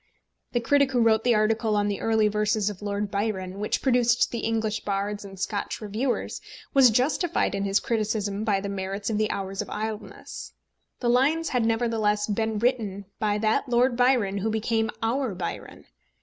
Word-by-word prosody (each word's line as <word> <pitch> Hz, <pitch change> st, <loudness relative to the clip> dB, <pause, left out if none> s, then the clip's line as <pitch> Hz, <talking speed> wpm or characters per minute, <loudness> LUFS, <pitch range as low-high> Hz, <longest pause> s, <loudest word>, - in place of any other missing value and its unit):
The 240 Hz, -, +2 dB
critic 275 Hz, +3 st, +2 dB
who 245 Hz, -, +3 dB
wrote 220 Hz, -1 st, +4 dB
the 245 Hz, -2 st, +4 dB
article 215 Hz, 0 st, +2 dB
on 205 Hz, 0 st, +2 dB
the 200 Hz, -1 st, -2 dB
early 220 Hz, -1 st, +3 dB
verses 210 Hz, 0 st, +1 dB
of 200 Hz, -, -11 dB
Lord 205 Hz, 0 st, -2 dB
Byron, 200 Hz, -2 st, -2 dB
which 210 Hz, -, -1 dB
produced 245 Hz, -2 st, +3 dB
the 235 Hz, -, -3 dB
English 220 Hz, -1 st, -1 dB
Bards 205 Hz, 0 st, -2 dB
and 195 Hz, -1 st, -10 dB
Scotch 200 Hz, +1 st, -3 dB
Reviewers, 220 Hz, +5 st, -2 dB, 0.3 s
was 270 Hz, -3 st, +7 dB
justified 280 Hz, -, +1 dB
in 200 Hz, 0 st, -1 dB
his 195 Hz, +1 st, +2 dB
criticism 215 Hz, -2 st, -1 dB
by 205 Hz, -3 st, +1 dB
the 200 Hz, -, -4 dB
merits 195 Hz, +2 st, -3 dB
of 210 Hz, -, 0 dB
the 215 Hz, -, +1 dB
Hours 195 Hz, 0 st, -3 dB
of -, -, -7 dB
Idleness. 210 Hz, -, -6 dB, 0.5 s
The 240 Hz, -, +1 dB
lines 300 Hz, +7 st, +2 dB
had 245 Hz, -4 st, +1 dB
nevertheless 225 Hz, -3 st, +1 dB
been 220 Hz, +1 st, -1 dB
written 210 Hz, -4 st, 0 dB
by 210 Hz, -1 st, +1 dB
that 220 Hz, +4 st, +1 dB
Lord 245 Hz, +1 st, +3 dB
Byron 240 Hz, -6 st, +2 dB
who 215 Hz, +3 st, -1 dB
became 220 Hz, 0 st, 0 dB
our 235 Hz, -2 st, 0 dB
Byron. 175 Hz, -1 st, -6 dB
215 Hz, 180 wpm, -26 LUFS, 205-235 Hz, 0.5 s, was